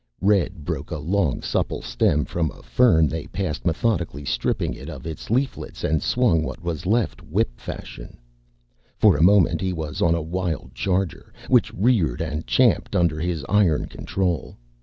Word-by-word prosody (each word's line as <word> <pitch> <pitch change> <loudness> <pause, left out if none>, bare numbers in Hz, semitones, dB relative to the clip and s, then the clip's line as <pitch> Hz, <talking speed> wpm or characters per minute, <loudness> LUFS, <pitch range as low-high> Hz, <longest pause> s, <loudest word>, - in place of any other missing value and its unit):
Red 95 -6 +1
broke 75 -3 -4
a 85 - -3
long, 80 -1 0
supple - - -1
stem 75 0 +1
from 85 -2 -1
a - - -14
fern 80 -11 +4
they 80 +1 -4
passed, 90 -3 -3
methodically 85 - -1
stripped - - -1
it - - -4
of - - -9
its 80 -1 -7
leaflets 130 +5 -2
and 80 -1 +1
swung 120 -11 +2
what 80 - -5
was 85 -1 -3
left 110 +2 +1
whip - - -1
fashion. - - -8 0.8
For - - +5
a 70 - -1
moment, 90 -3 +5
he 95 -1 -1
was 80 -3 -5
on 85 0 +4
a 85 - -1
wild 85 -1 -3
charger, 95 -2 -2 0.2
which - - +4
reared 95 - +2
and 80 -1 -3
champed 120 -5 +2
under 85 -4 +2
his 85 -4 -2
iron 95 -7 +3
control. 90 -4 -3
85 Hz, 165 wpm, -23 LUFS, 80-95 Hz, 0.8 s, For